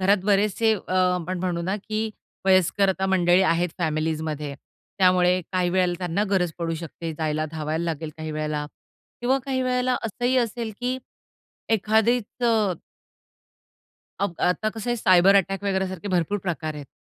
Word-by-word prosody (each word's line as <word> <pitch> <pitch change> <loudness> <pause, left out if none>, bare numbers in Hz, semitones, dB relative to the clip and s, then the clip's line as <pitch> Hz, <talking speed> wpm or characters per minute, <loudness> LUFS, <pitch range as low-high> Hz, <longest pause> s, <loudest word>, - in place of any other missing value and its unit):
घरात 195 +2 +4
बरेचसे 210 +2 +3
अ, 185 -2 -7
आपण 180 -1 +1
म्हणू 175 -1 -2
ना, 190 +3 -1
की 215 +1 -3 0.4
वयस्कर 190 +1 +4
आता 190 0 0
मंडळी 180 -1 +4
आहेत 175 0 +2
फॅमिलीजमध्ये, 155 -2 -2 0.4
त्यामुळे 180 -1 +4
काही 180 -1 +1
वेळेला 180 -1 +2
त्यांना 180 +3 0
गरज 180 -4 +1
पडू 165 -1 -2
शकते 165 0 -6
जायला, 155 -1 0
धावायला 160 +1 -2
लागेल 160 -2 -3
काही 155 0 -5
वेळेला 150 -1 -2 0.5
किंवा 255 +3 +2
काही 260 -2 -1
वेळेला 250 0 +1
असंही 245 +4 0
असेल, 230 -2 -1
की 255 +1 -1 0.7
एखादीचं 220 0 +2 1.5
अब 200 -3 0
आता 180 +4 +1
कसं 225 +2 -4
आहे, 240 - +1
सायबर 185 -2 +5
अटॅक 195 +1 +1
वगैरे 190 -1 +1
सारखे 190 +1 -6
भरपूर 185 +2 0
प्रकार 160 -5 -3
आहेत. 145 -2 -8
185 Hz, 150 wpm, -24 LUFS, 165-210 Hz, 1.5 s, सायबर